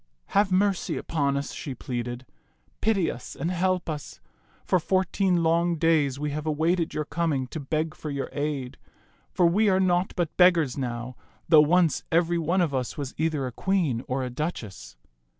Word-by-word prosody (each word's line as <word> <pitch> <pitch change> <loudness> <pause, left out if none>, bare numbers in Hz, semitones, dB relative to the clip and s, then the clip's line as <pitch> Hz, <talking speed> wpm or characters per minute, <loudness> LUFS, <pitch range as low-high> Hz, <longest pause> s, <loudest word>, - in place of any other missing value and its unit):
" - - -47 0.2
Have 200 -2 -2
mercy 195 0 +1
upon 140 -3 -1
us," 140 - -4
she 135 -4 -6
pleaded. 120 0 -5 0.3
" - - -40
Pity 205 -6 +2
us 120 - -9
and 165 +5 -2
help 185 0 0
us. 150 -3 -6 0.5
For 185 - +3
fourteen 185 0 +1
long 170 +1 +2
days 155 -4 +2
we 150 +1 -3
have 150 +2 -4
awaited 160 +2 0
your 150 - -1
coming 155 -5 -1
to 160 - -5
beg 155 +2 -2
for 155 - -7
your 140 -1 -3
aid; 145 -3 -3 0.5
for 175 - +2
we 205 +5 +4
are 190 -1 +3
naught 180 0 +1
but 175 -3 -2
beggars 170 -7 +4
now, 125 -2 -4 0.3
though 155 -3 +8
once 165 +1 +3
every 170 +1 +2
one 170 +4 +1
of 160 -5 0
us 130 -2 -2
was 140 -3 -4
either 155 -4 0
a 125 - -4
queen 160 -5 0
or 130 +1 -1
a 125 - -4
duchess." 110 - -5
155 Hz, 185 wpm, -26 LUFS, 140-175 Hz, 0.5 s, though